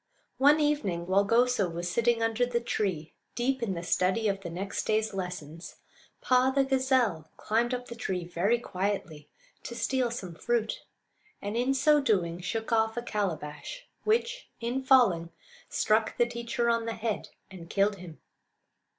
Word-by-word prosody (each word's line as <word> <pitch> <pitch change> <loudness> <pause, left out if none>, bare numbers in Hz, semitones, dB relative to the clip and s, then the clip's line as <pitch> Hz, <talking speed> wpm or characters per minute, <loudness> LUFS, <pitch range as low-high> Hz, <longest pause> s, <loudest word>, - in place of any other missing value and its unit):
One 290 +3 +6
evening, 285 - 0
while 190 +2 +3
Goso 230 -2 +2
was 170 +1 -4
sitting 230 +4 +2
under 225 +1 +1
the 245 -1 +1
tree 190 -9 -2 0.2
deep 260 +2 0
in 205 -5 -1
the 170 - -5
study 185 +5 +1
of 195 -1 -1
the 175 - -6
next 190 +4 -4
day's 215 0 +1
lessons, 180 -3 -6 0.5
Paa, 255 0 +4
the 275 0 +3
gazelle, 260 - +1
climbed 230 +3 0
up 250 0 -3
the - - -7
tree 185 -6 -3
very 180 +7 +1
quietly 185 -8 -3 0.3
to 235 - -7
steal 255 0 0
some 195 -7 -6
fruit, 230 +4 -1 0.6
and 205 +2 -4
in 250 +3 +1
so 295 +2 +4
doing 180 -9 +1
shook 225 +5 -3
off 225 0 +2
a 240 - -2
calabash, 200 - -4 0.2
which, 475 +3 0
in 240 +3 -2
falling, 240 -11 +4 0.4
struck 220 0 +1
the 240 - +4
teacher 235 0 -2
on 230 -1 +1
the 230 - -1
head 220 -1 -3 0.2
and 170 -3 -10
killed 200 +1 +2
him. 175 -4 -11
225 Hz, 160 wpm, -29 LUFS, 185-245 Hz, 0.6 s, One